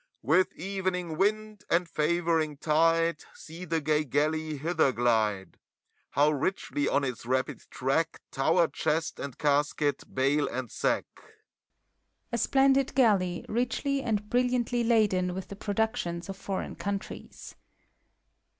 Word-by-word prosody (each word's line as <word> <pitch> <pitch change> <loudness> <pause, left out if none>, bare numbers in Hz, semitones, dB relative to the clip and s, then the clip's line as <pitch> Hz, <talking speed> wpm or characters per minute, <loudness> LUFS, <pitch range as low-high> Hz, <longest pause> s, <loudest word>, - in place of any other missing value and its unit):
With 160 +10 +3
evening 185 -3 -3
wind 215 +3 0
and 175 +1 +2
favoring 160 -1 0
tide, 165 +1 +2
See 165 +3 -9
the 165 -1 0
gay 150 0 +1
galley 155 +2 0
hither 160 -1 +2
glide! 110 -5 0 0.5
How 145 +2 +3
richly, 145 -1 -1
on 140 - +1
its 125 -4 -3
rapid 130 +2 -1
track, 160 +5 -1
Tower 165 +5 +3
chest 160 +1 -2
and 140 -4 -6
casket, 145 -1 +1
bale 140 +3 +1
and 125 -3 -5
sack! - - 0 1.3
(A 235 - -1
splendid 270 +2 +3
Galley, 195 -9 +2
richly 255 +4 -1
and 210 -4 -1
brilliantly 245 0 +1
laden 205 -6 +2
with 190 - -6
the 200 - -7
productions 200 -4 -2
of 195 - -4
Foreign 195 0 -4
Countries.) 200 0 -6
170 Hz, 125 wpm, -28 LUFS, 150-200 Hz, 1.3 s, With